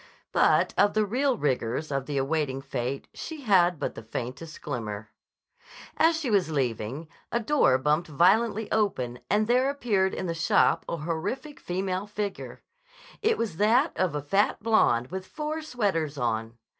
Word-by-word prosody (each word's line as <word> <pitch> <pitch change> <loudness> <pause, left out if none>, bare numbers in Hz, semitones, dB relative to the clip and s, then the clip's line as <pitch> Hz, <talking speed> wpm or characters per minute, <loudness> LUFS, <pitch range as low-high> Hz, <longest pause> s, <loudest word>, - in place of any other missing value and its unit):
But - - +3
of 205 - +4
the 215 -1 +3
real 255 +4 +1
rigors 130 - -1
of 135 -1 -2
the 145 -2 -2
awaiting 135 -1 0
fate 135 0 -4
she 320 -2 -7
had 180 - +4
but - - -3
the - - -8
faintest 130 +8 -6
glimmer. 110 -6 -5 0.8
As 325 0 +3
she 270 -7 -2
was 190 -5 +2
leaving, 130 +1 -2 0.2
a 235 - +1
door 225 - +3
bumped 150 +5 +1
violently 200 +8 +3
open 130 - 0
and 210 +1 +3
there 250 +4 +3
appeared 215 -9 0
in - - -3
the 170 - -1
"shop" 165 0 +2
a 170 - -2
horrific 170 - -4
female 185 +2 -2
figure. 205 -1 -5 0.6
It 445 +1 +2
was 210 -8 -3
that 240 - +3
of 180 -5 0
a 145 - -3
fat 195 +8 +1
blonde 130 - +3
with 185 0 -5
four 310 0 -4
sweaters 195 - -1
on. 115 -2 -2
175 Hz, 160 wpm, -27 LUFS, 135-220 Hz, 0.8 s, of